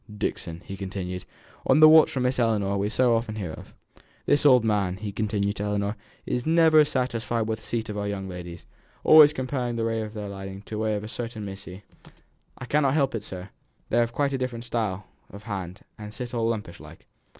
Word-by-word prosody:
Dixon," 85 -3 -4
he 95 - -6
continued, 95 -2 -5 0.4
"on - - +4
the 155 - +10
watch 160 0 +7
for 130 - -3
the - - +1
Miss 125 +1 0
Ellinor 105 -4 +1
we 100 +1 0
so 120 +1 +3
often 115 -1 -2
hear 95 -7 -4
of! - - -12 0.5
This 145 +1 +4
old 125 -4 +6
man," 100 -4 0
he 105 0 -5
continued 100 0 -1
to 100 - -3
Ellinor, 105 0 -1 0.3
"is 125 - -2
never 160 0 +5
satisfied 120 -4 -1
with 110 0 -2
the 110 - -15
seat 115 -2 -2
of 105 -1 -4
our 100 - -2
young 100 -1 -4
ladies, 90 -2 -8 0.4
always 155 -2 +8
comparing 130 -3 -3
their 115 -1 -1
way 115 0 -1
of 110 0 -7
riding 100 -1 -7
with - - -17
that 110 -1 0
of 105 - -4
a - - -6
certain 115 -2 -5
missy 95 0 -9 0.4
" - - -37 0.3
"I 130 - -7
cannot 140 +1 +2
help 140 -3 +2
it, 110 -3 -3
sir; 95 -1 -8 0.4
they've 120 0 +2
quite 140 +3 0
a 135 - -1
different 125 -2 -4
style 105 -5 -2 0.2
of 100 +2 -11
hand, 95 -4 -6 0.2
and 105 0 -7
sit 125 +2 -6
all 115 -1 0
lumpish 105 -7 -4
like. - - -14
110 Hz, 215 wpm, -26 LUFS, 100-125 Hz, 0.5 s, the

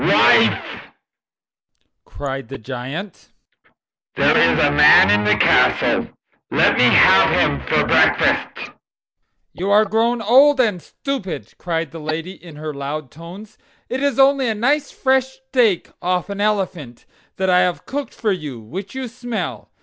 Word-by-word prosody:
"Wife," - - +2 1.2
cried 135 -3 -7
the - - -7
Giant, 135 - -8 0.9
"there - - +2
is - - +3
a - - +2
man 80 +6 +6
in 105 0 +2
the 105 0 +2
castle. - - +2 0.4
Let - - +2
me - - +3
have - - +5
him 70 - 0
for - - +1
breakfast." - - +1 0.8
"You 190 +3 -4
are 210 +2 +4
grown 225 +3 0
old 265 +6 +4
and 210 -8 0
stupid," 190 - -7
cried 165 -3 -4
the 165 - -9
lady, 160 +3 -5
in 175 -4 -14
her 155 0 -7
loud 140 -1 -6
tones. 190 +7 -13 0.3
"It 255 +2 -4
is 280 -3 -1
only 270 -1 +3
a 220 - -2
nice 280 +6 0
fresh 265 -1 0 0.2
steak 230 -9 +1
off 180 +2 -2
an 200 0 -5
elephant, 190 - -3 0.3
that 190 0 -1
I 180 - +4
have 180 -1 -1
cooked 285 0 -6
for 215 -3 -2
you, 150 -10 -6
which 180 - -9
you 265 -1 -5
smell. 220 - -6
185 Hz, 150 wpm, -19 LUFS, 150-235 Hz, 1.2 s, man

